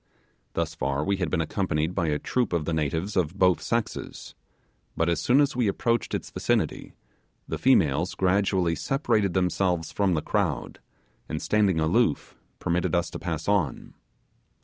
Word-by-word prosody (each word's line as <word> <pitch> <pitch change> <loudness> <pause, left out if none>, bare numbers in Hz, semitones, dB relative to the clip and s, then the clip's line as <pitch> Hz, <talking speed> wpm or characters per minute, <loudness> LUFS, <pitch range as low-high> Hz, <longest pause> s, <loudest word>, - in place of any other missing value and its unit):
Thus - - -1
far 70 +2 -1
we 100 +4 0
had 90 -4 -1
been 85 0 0
accompanied 80 -1 -1
by 90 -3 0
a 75 -1 +1
troop 120 +4 -1
of 85 -3 0
the 85 - -1
natives 80 +6 -1
of 90 -1 0
both 90 -2 +3
sexes; 115 -2 -3 0.6
but 80 - +1
as 85 - 0
soon 125 +3 +4
as 145 -2 +2
we 120 -3 +1
approached 115 +4 0
its - - -5
vicinity, - - -1 0.5
the - - -4
females - - +3
gradually 95 -2 +2
separated 105 - 0
themselves 90 -2 0
from 95 -4 +1
the 75 - -1
crowd, - - -1 0.5
and 80 - -2
standing 100 -4 +2
aloof, 80 0 +1 0.2
permitted 85 +1 0
us 85 0 0
to - - -6
pass 80 -2 -4
on. 100 -8 0
90 Hz, 160 wpm, -26 LUFS, 80-100 Hz, 0.6 s, soon